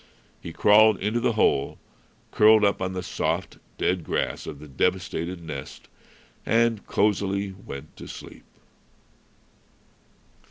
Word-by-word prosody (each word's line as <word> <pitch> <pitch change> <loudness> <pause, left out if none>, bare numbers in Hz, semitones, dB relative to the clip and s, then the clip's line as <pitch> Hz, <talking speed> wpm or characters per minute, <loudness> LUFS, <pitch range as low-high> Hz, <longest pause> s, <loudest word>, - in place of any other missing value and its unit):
He 85 - -7
crawled 105 +3 +5
into 105 +4 0
the 120 -1 +1
hole, 70 -10 +1 0.5
curled 110 0 +6
up 100 - +1
on 95 0 -2
the 90 -1 -4
soft, - - -3 0.2
dead 90 -1 0
grass - - -2
of - - -6
the 75 +2 -12
devastated 85 +5 -2
nest, 75 -4 -8 0.5
and 115 -2 +1
cosily 100 -1 0
went 75 -6 -10
to - - -10
sleep. - - -11
95 Hz, 120 wpm, -25 LUFS, 85-105 Hz, 0.5 s, curled